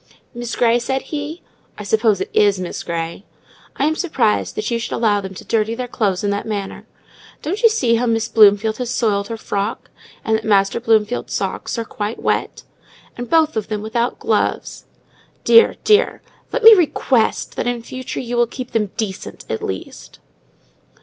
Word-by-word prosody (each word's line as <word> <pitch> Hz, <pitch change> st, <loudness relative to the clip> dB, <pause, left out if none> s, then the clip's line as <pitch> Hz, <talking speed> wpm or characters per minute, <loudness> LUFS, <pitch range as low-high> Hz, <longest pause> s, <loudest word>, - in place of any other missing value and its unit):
"Miss 240 Hz, -1 st, -5 dB
Grey," 235 Hz, 0 st, +3 dB
said 265 Hz, +2 st, -2 dB
he, 300 Hz, +3 st, -5 dB, 0.3 s
"(I 210 Hz, -, -7 dB
suppose 215 Hz, -1 st, +2 dB
it -, -, -4 dB
is 205 Hz, -2 st, +3 dB
Miss 180 Hz, -1 st, -5 dB
Grey), 170 Hz, +2 st, -4 dB, 0.5 s
I 275 Hz, -, 0 dB
am 310 Hz, -, +2 dB
surprised 265 Hz, -, 0 dB
that 215 Hz, +2 st, -3 dB
you 235 Hz, -, 0 dB
should 230 Hz, -, -5 dB
allow 210 Hz, -3 st, +2 dB
them 190 Hz, -1 st, -8 dB
to -, -, -10 dB
dirty 225 Hz, 0 st, 0 dB
their 250 Hz, +1 st, -4 dB
clothes 205 Hz, -6 st, -1 dB
in 205 Hz, -, +1 dB
that 200 Hz, +2 st, -3 dB
manner! 200 Hz, -3 st, -5 dB, 0.6 s
Don't 380 Hz, +9 st, -3 dB
you 460 Hz, -, +7 dB
see 245 Hz, -, +2 dB
how 245 Hz, +1 st, 0 dB
Miss 225 Hz, -1 st, 0 dB
Bloomfield 215 Hz, 0 st, +4 dB
has 250 Hz, -2 st, -3 dB
soiled 205 Hz, -5 st, 0 dB
her 230 Hz, -, -5 dB
frock? 205 Hz, 0 st, -4 dB, 0.3 s
and 220 Hz, -, +2 dB
that 220 Hz, -, -8 dB
Master 200 Hz, -1 st, +2 dB
Bloomfield's 225 Hz, 0 st, +1 dB
socks -, -, -3 dB
are 230 Hz, -, -3 dB
quite 210 Hz, +1 st, -5 dB
wet? -, -, -2 dB, 0.5 s
and 240 Hz, -1 st, -6 dB
both 320 Hz, -1 st, +3 dB
of 215 Hz, -2 st, -2 dB
them 215 Hz, -1 st, -4 dB
without 235 Hz, +2 st, -1 dB
gloves? -, -, -1 dB, 0.6 s
Dear, 460 Hz, 0 st, +6 dB
dear! 425 Hz, -1 st, +3 dB, 0.3 s
Let -, -, -2 dB
me 450 Hz, +1 st, +11 dB
request 280 Hz, -, +1 dB
that -, -, -2 dB
in 240 Hz, -1 st, -2 dB
future 255 Hz, +1 st, -6 dB
you 240 Hz, -1 st, -4 dB
will 240 Hz, 0 st, +3 dB
keep 250 Hz, +1 st, -7 dB
them 210 Hz, -3 st, 0 dB
decent 195 Hz, -4 st, -5 dB
at 110 Hz, -, -3 dB
least!" 95 Hz, -1 st, -7 dB
225 Hz, 185 wpm, -19 LUFS, 205-245 Hz, 0.6 s, me